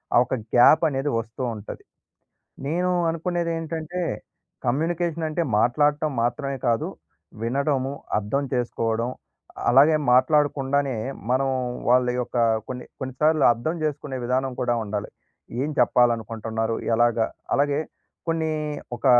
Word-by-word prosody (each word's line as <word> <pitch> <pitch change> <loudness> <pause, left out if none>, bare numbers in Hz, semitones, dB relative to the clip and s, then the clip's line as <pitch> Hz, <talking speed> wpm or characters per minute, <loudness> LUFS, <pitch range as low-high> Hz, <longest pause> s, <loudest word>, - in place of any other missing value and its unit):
ఆ - - +8
ఒక 130 - -2 0.2
గ్యాప్ 140 +7 +7
అనేది 135 +1 -1
వస్తూ 115 +3 -7
ఉంటది. 105 0 -9 0.8
నేను 180 +4 +1 0.2
అనుకునేది 170 0 -2
ఏంటంటే 165 +2 -4 0.7
కమ్యూనికేషన్ 165 +4 0
అంటే 170 +2 0 0.2
మాట్లాడటం 145 +5 +2
మాత్రమే 135 +2 -1
కాదు 115 -1 +1 0.6
వినడము, 135 +2 0 0.3
అర్థం 125 +8 -1
చేసుకోవడం 115 -1 -1 0.6
అలాగే 140 +5 +6 0.2
మాట్లాడకుండానే 140 0 +3 0.4
మనం 135 +2 +2 0.4
వాళ్ళ 125 +1 +5
యొక్క 125 0 -3 0.3
కొన్ని, 125 -1 -6
కొన్ని 130 -1 -4
సార్లు 155 -1 +4
అర్థం 140 +9 -3
చేసుకునే 145 -3 -3
విధానం 130 +2 0
కూడా 120 -1 +1
ఉండాలి. 105 -1 -4 0.5
ఏం 150 - -1
చెప్పాలనుకుంటున్నారు? 115 -2 +1 0.2
ఎలాగా? 120 -1 +3 0.3
అలాగే 145 +1 +2 0.5
కొన్ని 160 -1 0 0.5
ఒక 125 - -9
135 Hz, 115 wpm, -24 LUFS, 120-155 Hz, 0.8 s, ఆ